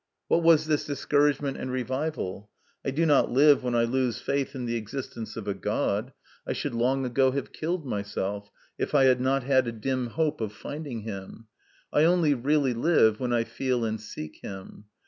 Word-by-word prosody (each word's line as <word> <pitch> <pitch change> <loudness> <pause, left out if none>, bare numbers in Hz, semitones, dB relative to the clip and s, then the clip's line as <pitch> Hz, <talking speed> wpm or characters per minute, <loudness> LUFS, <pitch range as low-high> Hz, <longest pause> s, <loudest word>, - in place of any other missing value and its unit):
What 170 - +4
was 165 -2 +5
this 155 -2 +1
discouragement 145 0 +1
and 130 - -4
revival? 130 -6 -3 0.3
I - - -1
do 155 +5 +1
not 145 -3 +4
live 140 +2 +5
when 125 -1 -1
I 115 - +4
lose 125 -1 0
faith 140 0 -2
in 125 -2 -4
the 120 0 -1
existence 115 -1 -6
of 105 -2 -6
a 100 - 0
God; 95 - -1 0.4
I - - 0
should - - -3
long 130 +3 +1
ago 130 +2 +3
have 140 - -4
killed 165 0 -3
myself, 100 -2 -3 0.3
if - - -1
I 140 - +6
had 130 -1 +4
not 135 +1 +1
had 130 -1 +3
a - - -1
dim 125 +3 -2
hope 155 +2 -1
of 105 -2 -3
finding 145 -1 -6
Him. 105 +1 -8 0.5
I 150 - +5
only 170 -3 +4
really 140 0 +1
live 115 -5 +3
when 125 -1 -1
I 120 -1 +2
feel 125 0 -1
and 110 -1 -3
seek 75 -8 -8
Him. 95 +1 -9
130 Hz, 190 wpm, -27 LUFS, 115-145 Hz, 0.5 s, I